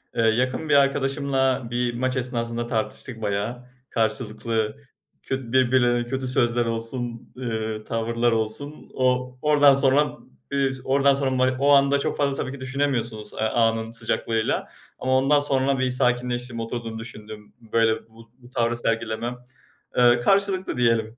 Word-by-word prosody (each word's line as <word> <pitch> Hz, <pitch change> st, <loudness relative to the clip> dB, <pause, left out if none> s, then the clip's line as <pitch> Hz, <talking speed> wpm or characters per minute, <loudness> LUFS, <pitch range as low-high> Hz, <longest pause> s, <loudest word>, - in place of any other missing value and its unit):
Eee, 115 Hz, -, +1 dB
yakın 125 Hz, +7 st, +1 dB
bir 145 Hz, -, +4 dB
arkadaşımla 135 Hz, -2 st, +1 dB
bir 120 Hz, 0 st, -1 dB
maç 130 Hz, +2 st, -1 dB
esnasında 120 Hz, -1 st, -2 dB
tartıştık 115 Hz, +1 st, -3 dB
bayağı. 105 Hz, +5 st, -3 dB, 0.2 s
Karşılıklı 110 Hz, 0 st, -1 dB, 0.5 s
kö 130 Hz, -3 st, -4 dB
birbirlerine 120 Hz, -2 st, +2 dB
kötü 130 Hz, 0 st, -2 dB
sözler 120 Hz, -1 st, +2 dB
olsun, 115 Hz, +1 st, -3 dB
ııı, 110 Hz, -3 st, -4 dB
tavırlar 115 Hz, +1 st, 0 dB
olsun, 115 Hz, +7 st, -2 dB
o 125 Hz, 0 st, 0 dB
oradan 145 Hz, -2 st, +5 dB
sonra, 140 Hz, +2 st, +3 dB, 0.3 s
eee, 135 Hz, -1 st, +1 dB
oradan 140 Hz, +1 st, +3 dB
sonra 135 Hz, -1 st, 0 dB
ma 130 Hz, 0 st, +2 dB
o 140 Hz, +1 st, +3 dB
anda 140 Hz, 0 st, +4 dB
çok -, -, -1 dB
fazla 140 Hz, -1 st, +1 dB
tabii 130 Hz, -, -3 dB
ki 140 Hz, -, -9 dB
düşünemiyorsunuz, 125 Hz, -5 st, -2 dB
eee, -, -, -9 dB
anın 115 Hz, 0 st, +1 dB
sıcaklığıyla 115 Hz, -1 st, -1 dB, 0.3 s
ama 130 Hz, 0 st, +1 dB
ondan 140 Hz, +2 st, +4 dB
sonra 135 Hz, -1 st, +2 dB
bir 130 Hz, -1 st, +1 dB
sakinleştim, 125 Hz, -1 st, 0 dB
oturdum, 115 Hz, -1 st, -5 dB
düşündüm, 110 Hz, -2 st, -10 dB, 0.2 s
böyle, 115 Hz, 0 st, +1 dB
bu 115 Hz, 0 st, -18 dB
bu 120 Hz, 0 st, -17 dB
tavrı 120 Hz, -1 st, 0 dB
sergilemem 115 Hz, +1 st, -1 dB, 0.6 s
Eee, 120 Hz, -1 st, +5 dB
karşılıklı 195 Hz, +1 st, +2 dB
diyelim. 115 Hz, -1 st, +1 dB
120 Hz, 140 wpm, -24 LUFS, 115-135 Hz, 0.6 s, oradan